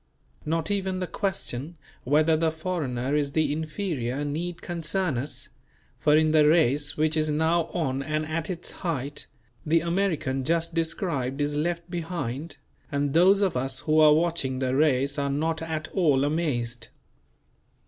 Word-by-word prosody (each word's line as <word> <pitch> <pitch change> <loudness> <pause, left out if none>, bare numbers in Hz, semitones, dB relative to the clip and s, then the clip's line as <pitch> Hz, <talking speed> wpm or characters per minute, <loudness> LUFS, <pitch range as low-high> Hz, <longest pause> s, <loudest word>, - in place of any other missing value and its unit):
Not 165 +3 0
even 190 -2 -1
the 185 - -1
question 170 -6 -3 0.3
whether 155 +4 +4
the 160 +1 +2
foreigner 150 -6 -2
is 145 -2 0
the 155 -2 +2
inferior 155 - -3
need 170 +4 -4
concern 175 -1 -1
us; 140 +4 -5 0.5
for 150 0 +4
in 155 0 +3
the 155 -1 +5
race 145 -3 +3
which 155 0 +2
is 155 -1 +1
now 160 +2 +2
on 135 -7 -2
and 155 +2 -2
at 160 0 -3
its 175 -2 -4
height, 145 -5 -4 0.4
the 160 +1 +2
American 165 -7 0
just 165 +3 0
described 160 -5 -1
is 145 0 0
left 170 +3 -1
behind; 165 -4 -4 0.3
and 140 -1 0
those 190 +4 +5
of 190 -7 +1
us 130 +1 -1
who 155 0 +2
are 150 -1 +7
watching 160 -5 0
the 130 0 0
race 140 -1 +2
are 140 0 0
not 160 +3 -1
at 160 -1 -3
all 150 -8 +2
amazed. 125 -7 -1
155 Hz, 155 wpm, -26 LUFS, 140-170 Hz, 0.5 s, are